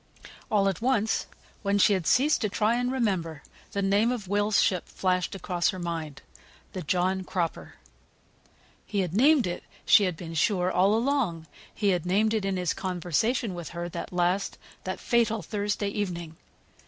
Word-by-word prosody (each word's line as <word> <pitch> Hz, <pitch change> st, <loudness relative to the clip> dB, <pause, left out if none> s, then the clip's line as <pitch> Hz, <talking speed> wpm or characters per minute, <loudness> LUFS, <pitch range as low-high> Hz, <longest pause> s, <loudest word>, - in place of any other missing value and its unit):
All 200 Hz, -2 st, +3 dB
at 195 Hz, 0 st, -1 dB
once, 225 Hz, -3 st, +1 dB, 0.3 s
when 200 Hz, -1 st, +1 dB
she 205 Hz, +1 st, +5 dB
had 185 Hz, -5 st, -1 dB
ceased 290 Hz, +5 st, +3 dB
to 215 Hz, -, 0 dB
try 215 Hz, +3 st, +1 dB
and 245 Hz, +1 st, 0 dB
remember, 185 Hz, -, -1 dB, 0.3 s
the 200 Hz, -, -1 dB
name 205 Hz, +5 st, +3 dB
of 225 Hz, -6 st, -4 dB
Will's 205 Hz, +2 st, +2 dB
ship 185 Hz, -3 st, +1 dB
flashed 185 Hz, 0 st, -1 dB
across 180 Hz, -2 st, 0 dB
her 190 Hz, -, -3 dB
mind. 165 Hz, -5 st, -5 dB, 0.5 s
The 185 Hz, -, -4 dB
John 185 Hz, +4 st, 0 dB
Cropper. 175 Hz, -3 st, -3 dB, 1.1 s
He 200 Hz, -2 st, 0 dB
had 175 Hz, -3 st, -3 dB
named 270 Hz, +5 st, +5 dB
it, 175 Hz, -1 st, -4 dB, 0.2 s
she 205 Hz, -, +6 dB
had 180 Hz, -3 st, -2 dB
been 165 Hz, -1 st, -7 dB
sure, 180 Hz, +2 st, +1 dB
all 195 Hz, +4 st, +3 dB
along. 230 Hz, -, 0 dB, 0.3 s
He 205 Hz, -, 0 dB
had 180 Hz, -4 st, +1 dB
named 215 Hz, +4 st, +2 dB
it 215 Hz, -3 st, 0 dB
in 195 Hz, -1 st, -1 dB
his 180 Hz, -3 st, 0 dB
conversation 190 Hz, -, -1 dB
with 175 Hz, -3 st, -6 dB
her 175 Hz, 0 st, -5 dB
that -, -, -6 dB
last, 180 Hz, +2 st, 0 dB, 0.3 s
that 185 Hz, -, -3 dB
fatal 225 Hz, -3 st, +1 dB
Thursday 205 Hz, +2 st, -2 dB
evening. 175 Hz, -6 st, -4 dB
195 Hz, 170 wpm, -27 LUFS, 175-215 Hz, 1.1 s, she